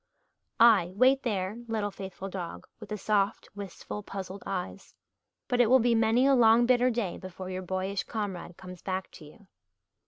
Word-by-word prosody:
Ay, 215 Hz, -7 st, +6 dB
wait 260 Hz, +5 st, +4 dB
there, 205 Hz, -3 st, -2 dB
little 215 Hz, -2 st, -2 dB
faithful 190 Hz, 0 st, -7 dB
dog 180 Hz, -3 st, -6 dB
with 215 Hz, -, -11 dB
the 210 Hz, -, -3 dB
soft, 205 Hz, +1 st, 0 dB
wistful, 200 Hz, +1 st, -7 dB
puzzled 195 Hz, -1 st, -7 dB
eyes. 195 Hz, 0 st, -5 dB, 0.5 s
But 245 Hz, -1 st, +2 dB
it 240 Hz, -, +4 dB
will 260 Hz, -, +7 dB
be 240 Hz, -1 st, +2 dB
many 225 Hz, +3 st, +3 dB
a 275 Hz, -, +5 dB
long 235 Hz, -1 st, +6 dB
bitter 250 Hz, 0 st, +4 dB
day 225 Hz, -7 st, -2 dB
before 185 Hz, 0 st, -8 dB
your 185 Hz, 0 st, -4 dB
boyish 190 Hz, +1 st, -3 dB
comrade 195 Hz, -6 st, -5 dB
comes 180 Hz, -2 st, -10 dB
back 190 Hz, 0 st, -4 dB
to 155 Hz, -, -13 dB
you. 190 Hz, +7 st, -17 dB
200 Hz, 175 wpm, -29 LUFS, 185-230 Hz, 0.5 s, will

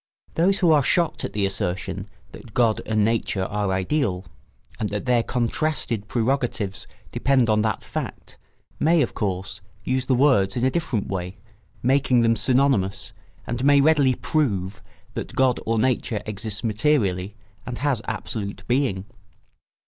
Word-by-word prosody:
Those 190 Hz, +4 st, +3 dB
who 175 Hz, -4 st, +4 dB
are 150 Hz, -2 st, +5 dB
shocked 170 Hz, +3 st, +1 dB
at -, -, -6 dB
the 105 Hz, -1 st, +1 dB
assertion 95 Hz, +1 st, -3 dB, 0.2 s
that 110 Hz, -5 st, -13 dB
God 115 Hz, -3 st, +3 dB
and 110 Hz, -1 st, +2 dB
Nature 110 Hz, -4 st, 0 dB
are 100 Hz, 0 st, -1 dB
ideal, 95 Hz, 0 st, 0 dB, 0.5 s
and 105 Hz, -, -1 dB
that 105 Hz, +4 st, -4 dB
their 125 Hz, -2 st, +3 dB
contrasted 120 Hz, -2 st, -1 dB
prerogatives 120 Hz, -5 st, -1 dB, 0.2 s
depend 130 Hz, -4 st, +2 dB
on 110 Hz, 0 st, +3 dB
that 110 Hz, -2 st, -1 dB
fact, -, -, -6 dB, 0.4 s
may, 160 Hz, 0 st, +4 dB
of -, -, -3 dB
course, 95 Hz, -2 st, -3 dB, 0.2 s
use 130 Hz, 0 st, 0 dB
the 130 Hz, -, +3 dB
same 125 Hz, -, +1 dB
words 105 Hz, -9 st, +4 dB
in 125 Hz, 0 st, +1 dB
a 130 Hz, -, +3 dB
different 135 Hz, -11 st, -1 dB
way, 90 Hz, 0 st, -4 dB, 0.5 s
making 130 Hz, -1 st, +3 dB
them 115 Hz, 0 st, +3 dB
synonymous, 125 Hz, -7 st, +1 dB, 0.3 s
and 120 Hz, +2 st, -3 dB
may 145 Hz, 0 st, +6 dB
readily 140 Hz, -3 st, +4 dB
"prove" 100 Hz, -, -1 dB, 0.3 s
that -, -, -6 dB
God 130 Hz, -2 st, +3 dB
or 115 Hz, 0 st, +1 dB
Nature 115 Hz, -2 st, 0 dB
exists 105 Hz, +1 st, -4 dB
materially 105 Hz, -5 st, +1 dB, 0.3 s
and 125 Hz, -1 st, -4 dB
has 140 Hz, -5 st, 0 dB
absolute 100 Hz, -3 st, -4 dB
being. 120 Hz, -7 st, 0 dB
115 Hz, 150 wpm, -23 LUFS, 100-135 Hz, 0.5 s, may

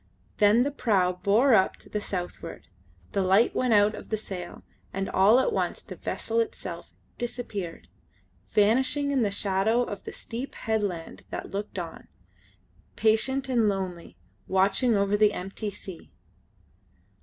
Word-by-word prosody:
Then 210 Hz, +3 st, +5 dB
the 285 Hz, -, -1 dB
prau 185 Hz, -9 st, +1 dB
bore 220 Hz, +7 st, +4 dB
up 190 Hz, -4 st, +4 dB
to -, -, -13 dB
the 210 Hz, -, -3 dB
southward: 180 Hz, -3 st, -6 dB, 0.4 s
the 200 Hz, -, +1 dB
light 190 Hz, +5 st, +4 dB
went 250 Hz, -3 st, +2 dB
out 205 Hz, +1 st, +5 dB
of -, -, -9 dB
the 220 Hz, -, 0 dB
sail, 185 Hz, -4 st, -7 dB, 0.3 s
and 195 Hz, 0 st, -2 dB
all 205 Hz, +6 st, +5 dB
at 465 Hz, -, +1 dB
once -, -, -1 dB
the -, -, -10 dB
vessel 460 Hz, -, -2 dB
itself 455 Hz, -1 st, -4 dB, 0.3 s
disappeared, 220 Hz, -8 st, -5 dB, 0.6 s
vanishing 255 Hz, +7 st, +3 dB
in 270 Hz, -2 st, +2 dB
the 210 Hz, -, +2 dB
shadow 200 Hz, +4 st, +1 dB
of 205 Hz, -4 st, -6 dB
the -, -, -6 dB
steep 245 Hz, +4 st, -6 dB
headland 205 Hz, -7 st, -2 dB
that -, -, -6 dB
looked 200 Hz, 0 st, -4 dB
on, 170 Hz, -3 st, -6 dB, 0.9 s
patient 265 Hz, +5 st, +2 dB
and 235 Hz, -5 st, +3 dB
lonely, 180 Hz, -, -4 dB, 0.3 s
watching 195 Hz, +5 st, +3 dB
over 200 Hz, +1 st, +2 dB
the 210 Hz, 0 st, +4 dB
empty 195 Hz, +3 st, -4 dB
sea. 190 Hz, -3 st, -10 dB
205 Hz, 145 wpm, -27 LUFS, 195-240 Hz, 0.9 s, Then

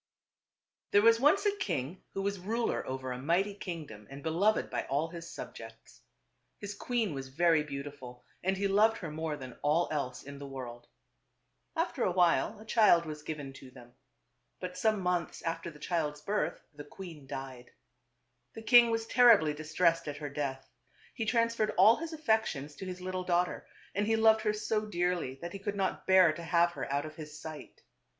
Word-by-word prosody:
There 205 Hz, -, +4 dB
was 230 Hz, 0 st, +6 dB
once 305 Hz, -, +4 dB
a 410 Hz, 0 st, +2 dB
king 165 Hz, -, -3 dB
who 195 Hz, -, -2 dB
was 200 Hz, -1 st, -1 dB
ruler 225 Hz, +6 st, -1 dB
over 130 Hz, 0 st, -4 dB
a 125 Hz, -, -4 dB
mighty 180 Hz, +8 st, +1 dB
kingdom 160 Hz, -, -7 dB
and 140 Hz, +1 st, -10 dB
beloved 185 Hz, +7 st, +2 dB
by -, -, -2 dB
all 145 Hz, +4 st, -1 dB
his 170 Hz, 0 st, -8 dB
subjects. -, -, -10 dB, 0.6 s
His 205 Hz, 0 st, -6 dB
queen 225 Hz, -3 st, -1 dB
was 135 Hz, -1 st, -5 dB
very 165 Hz, +3 st, +3 dB
beautiful 140 Hz, -4 st, -8 dB, 0.2 s
and 190 Hz, +1 st, +1 dB
he 200 Hz, +1 st, +1 dB
loved 215 Hz, +3 st, +4 dB
her 165 Hz, -4 st, -6 dB
more 155 Hz, -1 st, -3 dB
than 130 Hz, -3 st, -10 dB
all 155 Hz, +4 st, +2 dB
else 135 Hz, -5 st, -3 dB
in 140 Hz, 0 st, -9 dB
the 140 Hz, -, -7 dB
world. 120 Hz, -3 st, -8 dB, 0.9 s
After 330 Hz, -5 st, -1 dB
a -, -, +2 dB
while 180 Hz, +4 st, +2 dB
a 215 Hz, -, -12 dB
child 210 Hz, -7 st, +5 dB
was 155 Hz, -1 st, -6 dB
given 150 Hz, -3 st, -6 dB
to 135 Hz, -1 st, -12 dB
them. 120 Hz, -1 st, -15 dB, 0.7 s
But 180 Hz, 0 st, -6 dB
some 215 Hz, +2 st, +1 dB
months 180 Hz, -2 st, -1 dB
after 165 Hz, +1 st, -3 dB
the 155 Hz, -, -13 dB
child's 150 Hz, -2 st, -2 dB
birth 210 Hz, +5 st, -1 dB
the 145 Hz, 0 st, -9 dB
queen 155 Hz, -2 st, -10 dB
died. 130 Hz, -2 st, -7 dB, 0.9 s
The 225 Hz, -, -8 dB
king 240 Hz, +1 st, +7 dB
was 225 Hz, 0 st, -1 dB
terribly 225 Hz, -12 st, +6 dB
distressed 165 Hz, +2 st, +1 dB
at 145 Hz, 0 st, -4 dB
her 145 Hz, -1 st, -5 dB
death. 140 Hz, -2 st, -4 dB, 0.5 s
He 225 Hz, -, -3 dB
trans 230 Hz, 0 st, +2 dB
ferred 215 Hz, -1 st, 0 dB
all 210 Hz, +5 st, +7 dB
his 330 Hz, +1 st, -5 dB
affections 220 Hz, -, 0 dB
to 190 Hz, -, -6 dB
his 180 Hz, 0 st, -6 dB
little 185 Hz, 0 st, -3 dB
daughter, 180 Hz, 0 st, 0 dB, 0.3 s
and 205 Hz, +1 st, 0 dB
he 225 Hz, -, +3 dB
loved 220 Hz, 0 st, +5 dB
her 210 Hz, -1 st, +1 dB
so 215 Hz, 0 st, -1 dB
dearly 175 Hz, -7 st, -1 dB
that 175 Hz, -, -5 dB
he 195 Hz, -, -6 dB
could 205 Hz, +1 st, -3 dB
not 195 Hz, -1 st, -2 dB
bear 185 Hz, -4 st, +6 dB
to 170 Hz, -, -8 dB
have 170 Hz, +1 st, +3 dB
her 170 Hz, -, -5 dB
out 140 Hz, +1 st, 0 dB
of 155 Hz, 0 st, -9 dB
his 150 Hz, -1 st, -9 dB
sight. 155 Hz, -2 st, -10 dB
175 Hz, 190 wpm, -31 LUFS, 145-210 Hz, 0.9 s, king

